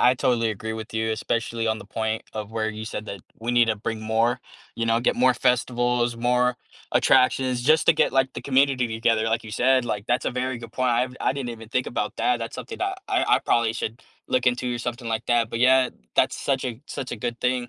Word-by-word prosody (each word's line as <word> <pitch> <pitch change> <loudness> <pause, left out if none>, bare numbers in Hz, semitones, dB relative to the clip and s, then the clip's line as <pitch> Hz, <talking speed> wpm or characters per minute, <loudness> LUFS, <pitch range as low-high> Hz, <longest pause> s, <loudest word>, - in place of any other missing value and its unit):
I 125 - +5
totally 120 -3 +1
agree 110 +1 -5
with 110 0 -7
you, 110 0 0
especially 115 +1 -2
on 110 0 0
the - - -10
point 110 +1 -2
of 105 -1 -5
where 110 -1 -1
you 110 0 -7
said 110 - -5
that 100 -2 -6 0.2
we 115 +2 -3
need 120 -1 +5
to 110 - +1
bring 110 +2 -4
more, 115 +3 +1 0.4
you 115 - -1
know, 115 0 +3
get 120 - +1
more 125 0 +4
festivals, 120 -1 +1
more 125 +1 +2 0.4
attractions, 130 -1 +3
just 155 +4 +4
to - - +8
get, - - +2
like, 135 0 +2
the - - -6
community 135 -2 +2
together, 110 0 +1
like 115 +1 0
you 110 - -8
said, 130 +3 +3
like 105 -3 -3
that's 120 +1 +1
a - - 0
very 125 0 -2
good 115 -1 -10
point, 130 0 +1
I've 125 +2 0
I - - +1
didn't 130 -3 -4
even 115 -2 -9
think 125 +2 -1
about 105 -3 -3
that, 125 -1 +1
that's 115 -1 -5
something 130 0 -7
that 380 +1 -2
I - - +2
I - - +5
probably 115 -1 +2
should 115 +1 -5 0.3
look 125 -1 +1
into 125 0 +1
or - - -4
something 120 0 -4
like 115 0 -2
that, 120 -2 +2
but 115 - -3
yeah, 130 +1 +5 0.3
that's - - +3
such 135 -1 0
a 120 -2 -4
such 130 - -5
a - - -4
good 120 +2 -4
thing. 125 -1 0
120 Hz, 240 wpm, -24 LUFS, 115-125 Hz, 0.4 s, to